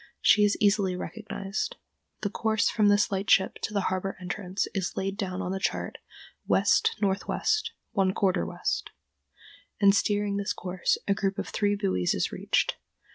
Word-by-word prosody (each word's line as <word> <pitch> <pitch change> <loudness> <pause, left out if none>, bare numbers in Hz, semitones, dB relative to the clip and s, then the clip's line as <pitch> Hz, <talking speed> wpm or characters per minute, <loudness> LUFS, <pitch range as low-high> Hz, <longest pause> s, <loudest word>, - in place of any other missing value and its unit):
She 210 - +5
is 205 0 +3
easily 200 -3 +2
recognized. 205 - -4 0.5
The 205 - -2
course 220 0 +1
from 210 -2 +3
this 205 0 +3
lightship 195 0 +2
to - - -2
the 205 -1 0
harbor 190 +1 -3
entrance 185 +1 -3
is 190 -3 -3
laid 195 +1 -1
down 190 -3 -3
on 180 - -3
the 190 - -2
chart - - -2 0.5
"west 450 +1 +3
northwest, 205 - 0 0.2
one 195 -4 +2
quarter 190 - +1
west," 85 - -2 0.9
and, 200 -1 +6
steering 205 0 +1
this 200 0 -1
course, 180 0 -1
a 200 - +4
group 195 -1 -1
of - - -4
three 205 -1 +1
buoys 190 - 0
is - - -1
reached. - - 0
200 Hz, 160 wpm, -27 LUFS, 190-205 Hz, 0.9 s, and